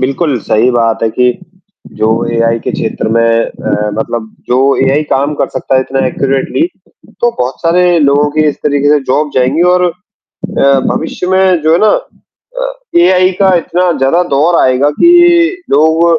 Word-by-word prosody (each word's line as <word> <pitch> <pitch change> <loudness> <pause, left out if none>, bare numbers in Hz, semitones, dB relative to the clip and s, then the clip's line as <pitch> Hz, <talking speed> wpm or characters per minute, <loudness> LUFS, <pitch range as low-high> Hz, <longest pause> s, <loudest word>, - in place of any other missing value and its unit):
बिल्कुल 135 +1 -1
सही 115 +5 +1
बात 115 -2 0
है 115 - +2
कि, 125 +1 0 0.5
जो 110 - -1 0.3
एआई 115 0 +1
के - - -5
क्षेत्र - - -3
में 115 +1 +1 0.2
अ, 105 0 -3
मतलब 110 0 -4 0.2
जो 125 - +1 0.3
एआई 140 +3 +1
काम 140 +3 0
कर - - -2
सकता - - -3
है 130 - +3
इतना 135 +1 -2
एक्यूरेटली, 135 - -1 0.5
तो 240 - +2
बहुत 125 +1 -3
सारे 175 +1 +2
लोगों 145 0 +2
की 155 +1 0
इस 145 - -3
तरीके 145 -1 0
से 150 - +4
जॉब 150 +3 0
जाएँगी 130 +6 +1
और 180 0 +1
अ, 170 -6 -3
भविष्य 165 +3 -4
में 190 -3 +2
जो 155 +1 +2
है 165 - +3
ना 215 - +3 0.7
अ, - - -3 0.3
एआई 185 +1 +3
का 190 -2 +3
इतना 175 +1 -1
ज़्यादा 135 +7 +1
दौर 160 +5 +2
आएगा 130 +3 +2
कि 345 +1 +4
लोग 160 +3 +2
145 Hz, 170 wpm, -11 LUFS, 130-180 Hz, 0.7 s, से